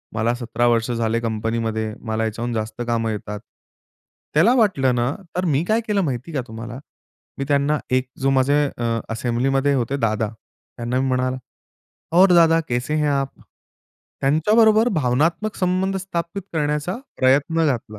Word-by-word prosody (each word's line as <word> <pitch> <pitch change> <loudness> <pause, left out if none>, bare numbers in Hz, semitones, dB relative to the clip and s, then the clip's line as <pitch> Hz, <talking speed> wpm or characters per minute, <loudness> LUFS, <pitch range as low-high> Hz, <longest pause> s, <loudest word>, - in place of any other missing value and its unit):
मला 115 +2 +1
17 120 0 -1
वर्ष 115 0 +2
झाले 115 -1 0
कंपनीमध्ये, 110 -1 -2
मला 110 -1 -2
याच्याहून 115 +2 -3
जास्त 110 +1 -4
कामं 115 -1 0
येतात." 105 0 -5 0.9
त्याला 170 +11 +5
वाटलं 145 - +2
ना, 120 +2 +1 0.2
तर 180 +1 0
मी 150 -2 +1
काय 225 +2 +2
केलं 205 -2 +1
माहिती 135 -1 -3
का 140 - 0
तुम्हाला? 115 +3 -7 0.6
मी 140 - -2
त्यांना 145 +1 +2
एक 130 0 +1
जो 135 - +2
माझे 135 +2 +3
अ, 115 -1 -1
असेंब्लीमध्ये 130 +4 +1
होते 130 +1 0
दादा, 110 -3 0 0.5
त्यांना 120 +2 -1
मी 135 - 0
म्हणाला, 130 0 0 0.8
"और 190 0 +7
दादा, 165 -1 +5
कैसे 125 +5 -1
हैं 150 -1 +1
आप?" 140 -1 -2 0.8
त्यांच्याबरोबर 215 - +4
भावनात्मक 160 - 0
संबंध 185 +1 0
स्थापित 185 0 -4
करण्याचा 150 +2 -1 0.2
प्रयत्न 145 +5 +3
घातला. 115 -6 -2
130 Hz, 145 wpm, -21 LUFS, 115-160 Hz, 0.9 s, और